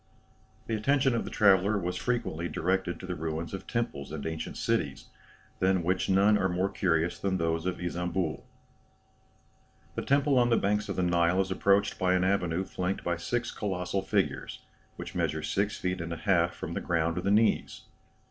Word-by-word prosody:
The 115 - -3
attention 135 +4 +2
of 115 - -1
the - - -5
traveller 100 0 +4
was 90 -1 -2
frequently 90 -7 -2
directed 90 +1 -1
to - - -8
the 90 - -3
ruins 80 0 -4
of 95 - -6
temples 115 - -3
and 75 -2 -5
ancient 80 0 -4
cities, - - -1 0.5
than 95 -1 +2
which 90 +3 0
none 100 +2 +4
are 95 -1 +1
more 90 +2 0
curious 85 -1 0
than 95 +1 0
those 80 0 -1
of 90 - -2
Isambul. 90 -1 -2 1.5
"The - - -3
temple 140 -1 +3
on 120 0 +3
the 115 - +4
banks 105 +1 0
of 95 - -2
the 90 - 0
Nile 85 +1 +2
is 95 0 0
approached 100 +2 +2
by 90 0 +3
an 90 - +2
avenue 90 -2 +1
flanked 90 +1 -3
by 85 - 0
six 120 +8 -2
colossal 95 -1 -2
figures, 95 - -1 0.3
which - - -7
measure - - -1
six 100 +1 -1
feet 90 -1 -2
and 85 0 -5
a 85 - -3
half 85 0 +2
from - - -6
the - - -3
ground 85 -1 0
to - - 0
the 95 - -1
knees. 110 +2 +2
95 Hz, 185 wpm, -29 LUFS, 85-100 Hz, 1.5 s, traveller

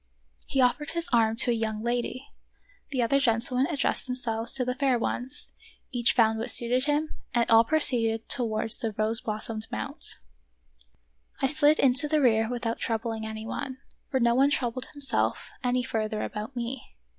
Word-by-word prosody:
He 270 - +1
offered 255 +4 +1
his 335 0 -2
arm 225 -1 +3
to 240 - +4
a - - +2
young 220 -1 -3
lady; 245 +2 -3 0.6
the 260 -4 0
other 275 +4 +2
gentlemen 250 +1 +1
addressed 285 -4 -1
themselves 235 -3 -3
to 265 - -1
other 250 0 -1
fair 265 -1 +1
ones; 250 +4 -3 0.4
each 240 -1 +1
found 220 -2 +3
what 235 +2 0
suited 250 +3 +5
him, 300 +1 0 0.3
and 235 -1 +2
all 225 0 +7
proceeded 230 -6 +1
towards 225 -2 -1
the 225 -3 -3
rose 220 +2 +2
blossomed 215 0 -3
mount. 110 - 0 1.2
I - - +1
slid 300 +2 +4
into 270 +3 +4
the 305 0 +1
rear 225 -4 +3
without 235 -2 -3
troubling 225 -1 -3
any 220 0 -7
one, 260 +2 -5 0.3
for 265 - 0
no 235 -1 +3
one 270 +3 +4
troubled 255 -2 -2
himself 285 -2 -1
any 250 0 +1
further 215 -2 -2
about 215 +5 -6
me. 240 +1 -6
240 Hz, 170 wpm, -27 LUFS, 225-265 Hz, 1.2 s, all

